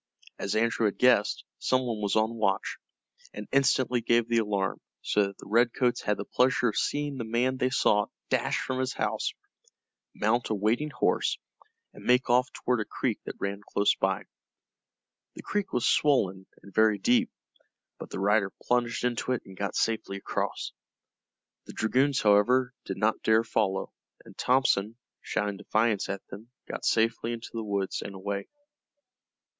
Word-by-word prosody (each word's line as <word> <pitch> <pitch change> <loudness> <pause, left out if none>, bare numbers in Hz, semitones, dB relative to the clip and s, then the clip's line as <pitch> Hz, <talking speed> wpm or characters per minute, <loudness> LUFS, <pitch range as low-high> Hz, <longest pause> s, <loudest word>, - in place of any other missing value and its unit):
As 100 - -2
Andrew 115 0 +1
had 100 - -3
guessed, 125 -5 +3 0.2
some 130 0 +1
one 115 -3 -3
was 100 -2 0
on 110 +1 +2
watch, 100 -4 -1 0.6
and 105 - -7
instantly 130 -2 +2
gave 115 0 +2
the 120 -1 +2
alarm, 100 -3 -1 0.2
so 105 -1 +2
that 100 - -10
the - - -13
Redcoats 120 +3 +2
had 105 - 0
the - - -5
pleasure 125 -1 +2
of 105 - -5
seeing 145 -1 -1
the - - -2
man 120 +3 0
they 130 0 +1
sought 105 -5 +2 0.2
dash - - 0
from 130 0 -3
his 130 0 -1
house, - - -2 0.8
mount 115 +3 +1
a 110 - +1
waiting 110 +9 0
horse, - - +1 0.6
and - - -13
make 125 0 +3
off 125 +1 +3
toward 125 -1 -1
a 105 - -1
creek - - -2
that - - -6
ran 100 0 -3
close 100 0 +2
by. 95 0 -1 1.1
The - - -9
creek 205 -2 -2
was 125 - 0
swollen 95 -10 +2 0.2
and 100 - -14
very 110 -1 +4
deep, 120 +5 +2 0.7
but - - -8
the - - -5
rider 100 0 +2
plunged 120 -1 0
into 125 +1 0
it 125 - -3
and 95 - -12
got 100 +1 -3
safely 110 -3 -1
across. 95 - -3 1.0
The - - -9
dragoons, 135 +5 +2
however, 125 +5 +4
did - - -4
not 110 +1 +1
dare 110 +1 +4
follow, 105 -4 -1 0.3
and - - -14
Thompson, 120 -5 +2 0.3
shouting 105 -1 -2
defiance 110 0 0
at 100 0 -4
them, 105 +4 -10 0.2
got - - -5
safely 115 +1 +1
into 115 -1 -7
the 115 -1 -3
woods 100 -2 -2
and 100 - -7
away. 100 +1 -4
110 Hz, 165 wpm, -28 LUFS, 100-125 Hz, 1.1 s, very